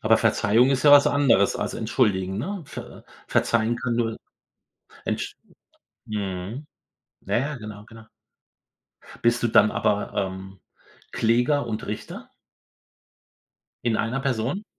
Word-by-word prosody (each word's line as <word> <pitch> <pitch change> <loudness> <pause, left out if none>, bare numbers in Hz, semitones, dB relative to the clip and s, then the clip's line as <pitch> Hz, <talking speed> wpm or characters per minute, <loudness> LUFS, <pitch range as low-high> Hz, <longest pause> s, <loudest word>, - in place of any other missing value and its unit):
Aber - - +4
Verzeihung 115 +6 +3
ist 130 -1 +1
ja 145 - +8
was 145 0 +8
anderes 125 -9 +3
als - - -3
entschuldigen, 100 -5 0
ne? 190 - -4
Ver - - -10 0.2
verzeihen 115 +1 +1
kann 120 -1 -2
nur 115 -2 -1 0.9
entsch - - -3 0.7
mhm. 105 +5 -5 0.6
Ja, 100 +4 -1
ja, 140 +4 -1
genau, 105 -1 -9
genau. 115 -1 -14 1.2
Bist 120 +1 +2
du 120 - +2
dann 110 -1 +5
aber, 105 0 0
ähm, 95 -1 -4 0.5
Kläger 120 +5 +2
und 110 -2 -4
Richter 105 - -7 1.5
in 115 -2 +1
einer 120 +5 -1
Person? 135 - -2
115 Hz, 120 wpm, -24 LUFS, 105-130 Hz, 1.5 s, ja